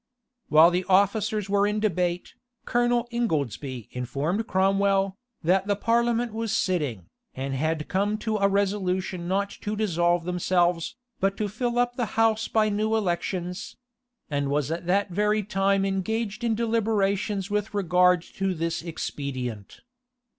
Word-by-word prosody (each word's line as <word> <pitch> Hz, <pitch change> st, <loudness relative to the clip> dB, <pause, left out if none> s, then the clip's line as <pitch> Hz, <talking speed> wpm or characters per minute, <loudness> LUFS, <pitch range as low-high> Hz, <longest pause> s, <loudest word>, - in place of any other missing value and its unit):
While 160 Hz, +3 st, +7 dB
the 180 Hz, +1 st, 0 dB
officers 205 Hz, +2 st, +2 dB
were 200 Hz, 0 st, +2 dB
in 210 Hz, +1 st, 0 dB
debate, 180 Hz, -4 st, -1 dB, 0.3 s
Colonel 240 Hz, 0 st, +1 dB
Ingoldsby 140 Hz, -, -2 dB
informed 145 Hz, -, -2 dB
Cromwell, 195 Hz, 0 st, +2 dB, 0.3 s
that 185 Hz, +4 st, +2 dB
the 205 Hz, -, +2 dB
parliament 235 Hz, +2 st, +1 dB
was 225 Hz, -1 st, -2 dB
sitting, 145 Hz, -, -1 dB, 0.3 s
and 135 Hz, +1 st, -3 dB
had 155 Hz, +3 st, -1 dB
come 205 Hz, +3 st, 0 dB
to 220 Hz, 0 st, -1 dB
a 200 Hz, -1 st, +3 dB
resolution 190 Hz, -3 st, -1 dB
not 200 Hz, +2 st, 0 dB
to 210 Hz, +1 st, -3 dB
dissolve 175 Hz, -4 st, +1 dB
themselves, 180 Hz, 0 st, +1 dB, 0.2 s
but 195 Hz, +1 st, 0 dB
to 210 Hz, -, -1 dB
fill 240 Hz, +4 st, -2 dB
up 245 Hz, 0 st, +1 dB
the 245 Hz, -3 st, 0 dB
house 225 Hz, 0 st, +3 dB
by 220 Hz, -1 st, +2 dB
new 215 Hz, +1 st, 0 dB
elections; 180 Hz, -2 st, -2 dB, 0.5 s
and 145 Hz, -2 st, -1 dB
was 145 Hz, +1 st, 0 dB
at 170 Hz, +1 st, -4 dB
that 195 Hz, +1 st, +1 dB
very 210 Hz, +3 st, +1 dB
time 195 Hz, 0 st, +1 dB
engaged 215 Hz, +3 st, -2 dB
in 230 Hz, -2 st, +1 dB
deliberations 210 Hz, -3 st, 0 dB
with 210 Hz, 0 st, -1 dB
regard 180 Hz, -2 st, +3 dB
to 190 Hz, 0 st, -3 dB
this 165 Hz, 0 st, -2 dB
expedient. 130 Hz, -, -5 dB
195 Hz, 140 wpm, -26 LUFS, 175-215 Hz, 0.5 s, While